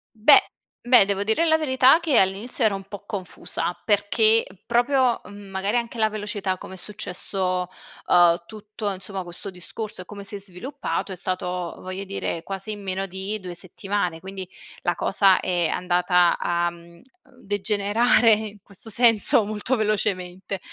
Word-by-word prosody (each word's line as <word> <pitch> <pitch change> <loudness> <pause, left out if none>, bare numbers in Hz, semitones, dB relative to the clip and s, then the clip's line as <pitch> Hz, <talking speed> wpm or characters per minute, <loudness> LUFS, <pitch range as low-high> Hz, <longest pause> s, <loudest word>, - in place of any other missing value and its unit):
Beh, 225 +7 +7 0.4
beh 245 -4 +6
devo 200 0 -1
dire 220 +11 +2
la 315 -1 +4
verità, 265 -1 +5
che 315 -7 +1
all'inizio 200 +6 +1
ero 215 - +3
un 195 - -7
po' 205 -1 -9
confusa, 185 -3 -5
perché 215 +2 +3 0.2
proprio 245 +1 +2
mhmm, 205 -1 -11
magari 195 +4 -1
anche 235 0 -3
la 220 0 +3
velocità 205 -3 -3
come 190 - -10
è - - -9
successo, 185 -1 -3 0.4
uhm, 175 -1 +5
tutto 210 -1 -5
insomma 190 0 -6
questo 175 +3 -9
discorso 185 +3 -7
e - - -10
come 200 +1 -9
si 205 +1 -7
è - - -5
sviluppato, 200 +5 -4
è - - -4
stato, 180 -1 -3
voglio 185 +1 -6
dire, 190 -3 -3
quasi 195 +3 -5
in 205 -1 -6
meno 190 0 -2
di 195 +3 -4
2 180 -2 -7
settimane; 180 0 -3
quindi 190 +1 -7 0.3
la 175 - 0
cosa 195 -1 +3
è 175 -3 0
andata 180 0 +2
a, 175 0 0
mhmm, 170 0 -15
ehm 170 - -19 0.3
degenerare 210 +1 +2
in 210 -1 -2
questo 200 +2 -9
senso 230 +2 +4
molto 215 +4 -1
velocemente. 195 -3 -2
200 Hz, 160 wpm, -24 LUFS, 185-220 Hz, 0.4 s, Beh